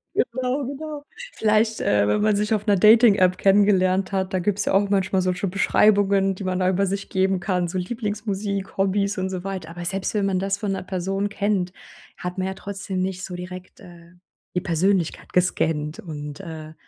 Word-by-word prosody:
Genau, 260 +3 -1
genau. 290 +2 -6 0.3
Vielleicht, 220 +1 +1
äh, 105 0 +2
wenn 105 - +1
man 210 0 +3
sich 210 +2 0
auf 210 -1 -1
'ner 205 -2 +4
Dating 220 +2 +7
App 185 -2 +3
kennengelernt 195 -1 +3
hat, 190 -1 -1
da 185 - +1
gibt 190 +2 0
es 205 - +1
ja - - 0
auch 200 +1 +3
manchmal 190 -1 +1
solche 185 +1 -1
Beschreibungen, 195 0 +3
die 195 - -7
man 185 -1 -1
da 185 0 +2
über 190 +1 +1
sich 200 +1 -3
geben 190 0 +1
kann, 180 -2 -1
so 180 +2 -4
Lieblingsmusik, 205 -1 -3
Hobbys 200 +1 +1
und 190 0 -1
so 185 -1 -5
weiter. 190 -4 -5
Aber 175 +1 -7
selbst 190 +2 -2
wenn 205 -2 +1
man 190 -2 +1
das 195 +1 -1
von 205 -1 -3
'ner 190 -1 -3
Person 195 +2 -2
kennt, 200 -3 -1 0.4
hat 180 +1 -5
man, 185 0 -1
ja, 190 - -3
trotzdem 195 -1 -4
nicht 185 0 -3
so 180 - -6
direkt, 180 +1 -9
äh, 170 -1 -15 0.4
die 180 - +1
Persönlichkeit 175 0 0
gescannt. 160 -2 0
Und, 150 -6 -7
äh, 160 -4 -8
190 Hz, 200 wpm, -23 LUFS, 180-205 Hz, 0.4 s, Dating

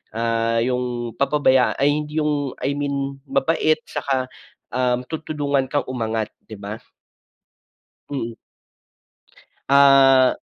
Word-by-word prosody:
ah, 115 0 0
yung 125 -1 -2
papabaya 140 -2 +3
ay 145 +2 +1
'di 155 +1 -2
yung 145 -3 -1
I 140 - +1
mean 140 -1 -3
mabait 155 +2 +2
'tsaka, 130 -2 -3 0.4
ah, 125 0 +1 0.2
tutulungan 145 -4 -1
kang 145 +2 -1
umangat, 110 -3 -2 0.2
'di 110 - -8
ba? 105 +2 -7 1.3
Hmm. 120 -5 -4 1.4
Ah. 135 -2 +6
135 Hz, 105 wpm, -21 LUFS, 120-145 Hz, 1.4 s, Ah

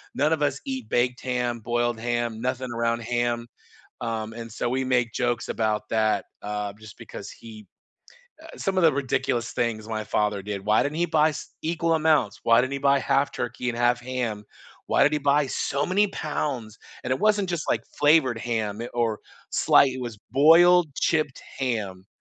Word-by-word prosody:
none 150 +4 +2
of 155 - -2
us 140 -1 0
eat 130 -5 -5
baked 125 +1 +1
ham, 125 -2 -1
boiled 120 0 0
ham, 120 -1 -2
nothing 130 0 -2
around 115 0 0
ham, 120 0 -1 0.5
um, 110 -1 -3
and 115 -1 -7
so 120 - -2
we 130 +1 -1
make 120 -3 +1
jokes 120 -1 -1
about 110 -1 -1
that, 110 -2 +1 0.2
uh, 105 -1 -3
just 110 -2 -12
because - - -9
he 110 -2 -12 0.8
uh, 320 - -12
some 195 -1 -1
of - - +3
the 160 - +6
ridiculous 120 -3 -1
things 110 -3 -2
my 110 -1 -3
father 105 -1 0
did. 100 -1 -5
"Why 105 +1 +3
didn't 145 +2 -3
he 175 - +2
buy 155 -1 +3
s - - -8
equal 165 +1 0
amounts? 155 -10 +2
Why 115 +1 +6
didn't 130 +1 -3
he - - -2
buy 140 - +4
half 140 +2 +1
turkey 125 - -4
and 115 - -6
half 120 0 +2
ham? 120 -4 -3 0.4
Why - - +3
did 150 - +3
he - - +1
buy 145 -1 +3
so 140 +3 -1
many 200 +3 +3
pounds?" 130 - -4 0.3
And 125 - -3
it 130 - -1
wasn't 205 -3 +2
just, 170 -3 -2
like, 115 - 0
flavored 145 -6 +4
ham, 110 -3 -2
i 120 - -5
or, 115 -3 0 0.3
sli - - +5
it 130 - -6
was 115 -4 -6
boiled, 165 +1 +6
chipped 155 -5 0 0.2
ham. 105 -8 -3
120 Hz, 190 wpm, -25 LUFS, 110-145 Hz, 0.8 s, the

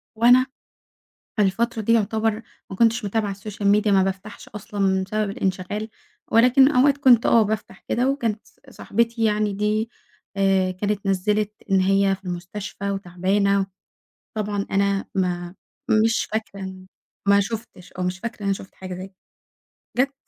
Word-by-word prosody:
وأنا 245 +3 +6 0.9
في - - +3
الفترة 225 +4 0
دي 220 - 0
يُعتبر 220 0 +1 0.3
ما 190 - -6
كنتش 230 0 +2
متابعة 205 -1 -1
الSocial 205 0 -7 0.2
Media 210 - -3
ما 195 -2 +4
بافتحش 195 +2 -5
أصلًا، 195 -2 -1
بسبب 215 +1 -1
الإنشغال 195 +3 -3 0.4
ولكن 250 +4 +6
أوقات 280 +1 +4
كنت 255 -5 +5
آه 230 - +5
بافتح 210 -2 -4
كده 250 +3 +2
وكانت 230 -6 -2
ص - - -26
صاحبتي 230 +1 -1
يعني 210 -1 +1
دي 210 +2 0 0.5
آآ، 195 -1 +2
كانت 200 +2 -2
نزِّلت 210 +2 +1 0.2
إن 195 - +5
هي 195 +1 +3
في 190 0 -22
المستشفى 190 +3 -5
وتعبانة، 195 +1 0 0.7
طبعًا 205 -1 -2
أنا 200 0 +1
ما 180 -1 -1 0.5
مش 225 0 +2
فاكرة، 200 -3 -4 0.5
ما 200 0 +6
شُفتش 200 -3 -6
أو 185 - -5
مش 180 +1 -2
فاكرة 230 0 -6
إن - - -6
أنا 195 - +2
شُفت 190 - -11
حاجة 185 -1 -7
زي 185 +1 -7
ك 190 - -34 0.8
جَت 275 +2 +2
205 Hz, 150 wpm, -23 LUFS, 190-220 Hz, 0.9 s, وأنا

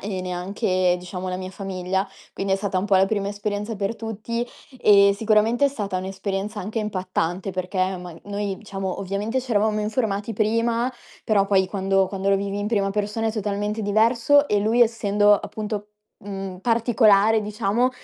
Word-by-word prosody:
e 195 -2 -4
neanche, 180 0 0
diciamo, 180 +1 -6
la 180 - -2
mia 185 0 -6
famiglia. 190 0 -3 0.2
Quindi 195 0 0
è - - 0
stata 195 -2 -1
un 190 - -1
po' 200 -2 +4
la 190 - +5
prima 200 0 -1
esperienza 205 +1 -3
per 200 +2 -2
tutti. 225 +1 -4 0.3
Ehm, 200 -1 +6
sicuramente 220 +5 +3
è - - +2
stata 205 -8 -3
un'esperienza 195 +2 -4
anche 215 +4 -4
impattante, 185 -3 -2
perché 185 0 -1
ma 175 -1 -9
noi 200 -1 -3
diciamo, 195 -3 -4
ovviamente 200 +5 -2
c'eravamo 215 -4 +1
informati 210 -1 -1
prima. 230 +3 +1 0.3
Però, 205 -3 +3
poi 190 -1 +3
quando 195 -1 +1
quando 195 0 -2
lo 195 - +4
vivi 200 +1 -3
in 205 0 -2
prima 200 -3 +1
persona 210 +2 -1
è 220 - 0
totalmente 210 0 -2
diverso. 230 +7 +3
E 205 - +2
lui 220 +4 +2
essendo, 210 -3 +4
appunto, 210 0 -4 0.4
mhmm, 195 -2 -6
particolare, 225 -2 +4
diciamo, 210 +3 0
205 Hz, 165 wpm, -23 LUFS, 195-220 Hz, 0.4 s, Ehm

